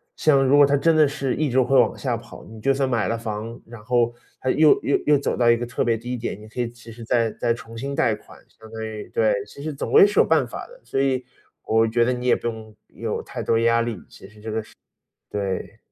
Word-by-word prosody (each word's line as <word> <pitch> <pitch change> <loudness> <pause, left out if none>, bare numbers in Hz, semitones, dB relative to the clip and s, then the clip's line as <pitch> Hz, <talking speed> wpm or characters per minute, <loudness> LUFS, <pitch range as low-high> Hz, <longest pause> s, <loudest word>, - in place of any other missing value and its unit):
像 140 -3 +3
如 135 +2 +4
果 145 - +7
它 145 - +2
真 165 +3 +3
的 155 -2 +5
是 135 -3 -2
一 155 -2 0
直 130 +2 +2
会 130 +2 +3
往 - - +2
下 - - -1
跑， - - -11
你 110 0 -12
就 135 - +2
算 135 -1 0
买 115 -5 0
了 115 - -1
房， 115 +1 -5
然 115 -2 -12
后 120 0 +1 0.3
它 130 - 0
又 155 +2 +5
又 140 - +2
又 150 -1 +6
走 140 - -2
到 120 -1 +3
一 115 - +5
个 120 - -3
特 120 - -2
别 115 -2 +1
低 125 +3 -5
点， 115 -4 -5
你 110 - -12
可 125 +3 -4
以 120 - -2
其 120 -1 -14
实 115 +1 -10
再 115 -1 +1
再 115 - -1
重 115 -1 -12
新 140 +4 -4
贷 115 -4 +2
款， - - -16 0.2
相 110 0 -14
当 110 0 -5
于 110 -1 -7
对， - - +2
其 140 - -11
实 155 -1 -3
总 140 - -5
归 - - +8
是 205 - +1
有 - - +6
办 - - +2
法 - - -7
的。 - - -16
所 135 - -3
以 130 -2 0 0.4
我 115 0 +3
觉 115 +1 +2
得 125 - +1
你 125 0 -5
也 - - +5
不 - - -4
用 110 -2 -7
有 - - -4
太 - - -6
多 115 - +2
压 115 0 +3
力， 115 -3 -3
其 - - -14
实 105 0 -18
这 110 +1 -6
个 110 +1 -1
是 - - -19 0.6
对。 100 -2 -4
120 Hz, 290 characters per minute, -23 LUFS, 115-135 Hz, 0.6 s, 归